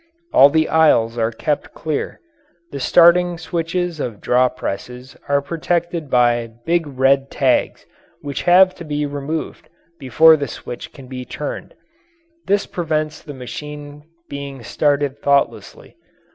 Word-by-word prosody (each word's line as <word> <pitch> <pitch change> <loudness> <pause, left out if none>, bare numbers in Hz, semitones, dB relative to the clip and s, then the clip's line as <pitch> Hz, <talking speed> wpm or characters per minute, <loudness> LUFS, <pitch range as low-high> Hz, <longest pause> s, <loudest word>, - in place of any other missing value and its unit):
All 140 - +8
the 155 +1 +2
aisles 135 -8 +3
are 115 0 +1
kept 145 +6 -3
clear. 155 -3 -4 0.5
The 140 - -5
starting 175 +4 +4
switches 170 0 -3
of 115 -7 -4
draw 125 +1 +2
presses 125 +2 -7
are 140 0 +2
protected 170 +1 -2
by 120 -2 +2
big 170 -1 +1
red 135 0 +2
tags 130 -2 0 0.4
which 140 -1 -4
have 185 +1 +5
to 175 - -8
be 150 -2 -2
removed 145 +2 -5 0.3
before 155 +4 +5
the 140 -1 -3
switch 120 - -8
can 135 -3 -13
be 130 0 -7
turned - - -7 0.7
this 200 +1 +1
prevents 155 -3 -3
the 145 -3 -10
machine 145 +3 -8 0.3
being 140 -3 -7
started 145 +2 0
thoughtlessly. 140 0 -1
145 Hz, 130 wpm, -19 LUFS, 130-160 Hz, 0.7 s, All